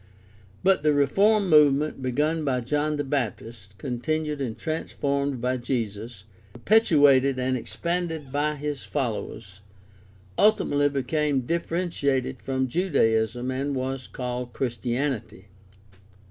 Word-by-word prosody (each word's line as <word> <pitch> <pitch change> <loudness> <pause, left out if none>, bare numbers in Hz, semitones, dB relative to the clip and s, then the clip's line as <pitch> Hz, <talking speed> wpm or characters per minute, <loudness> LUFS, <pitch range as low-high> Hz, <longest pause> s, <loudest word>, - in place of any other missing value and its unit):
But 190 -3 +4
the 150 0 +3
reform 195 +9 +3
movement 150 -3 +4
begun 150 +5 0
by 130 -3 0
John 150 +5 0
the 145 - -1
Baptist, 115 -6 -4
con 125 -2 -4
tinued 155 +1 -2
and 125 -5 -3
transformed 140 -4 -2
by 125 +2 0
Jesus, 115 -4 -4 0.3
perpetuated 140 - +4
and 130 0 0
expanded 165 +1 -3
by 150 +2 0
his 150 -1 -4
followers, 110 -6 -4 0.8
ultimately 145 -9 +3
became 140 +1 0
differentiated 145 -4 -1
from 130 -1 -1
Judaism 120 - +1
and 135 +2 -2
was 130 0 -3
called 125 -1 -5
Christianity. 120 -5 -3
135 Hz, 110 wpm, -25 LUFS, 125-150 Hz, 0.8 s, But